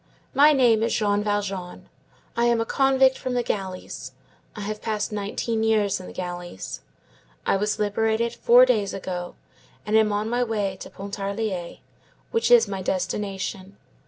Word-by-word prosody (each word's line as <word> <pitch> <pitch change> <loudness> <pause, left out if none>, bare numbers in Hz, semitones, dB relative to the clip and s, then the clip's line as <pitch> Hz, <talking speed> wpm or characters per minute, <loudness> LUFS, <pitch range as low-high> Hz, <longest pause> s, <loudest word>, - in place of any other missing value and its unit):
My 290 +2 +7
name 245 -6 +4
is 230 +1 +1
Jean 205 -1 +1
Valjean. 200 -3 -3 0.5
I 235 - +2
am 235 -1 +3
a 225 - 0
convict 265 0 +3
from 255 -1 -3
the 245 - +1
galleys. 190 -4 -5 0.4
I 210 - -6
have 210 +1 -4
passed 215 -2 -2
nineteen 210 +2 -2
years 210 -3 +2
in 185 - -9
the - - -9
galleys. 175 - -6 0.6
I - - +3
was 210 +2 -1
liberated 220 +3 0
four 245 +2 +6
days 215 -6 +1
ago, 180 -2 -5 0.5
and 210 +1 0
am 220 -1 +4
on 205 +1 -1
my 245 +2 +1
way 205 -5 -1
to - - -9
Pontarlier, 200 -2 -4 0.5
which 460 -1 +1
is 240 -2 +7
my 195 -1 -4
destination. 190 +1 -3
210 Hz, 160 wpm, -24 LUFS, 195-230 Hz, 0.6 s, My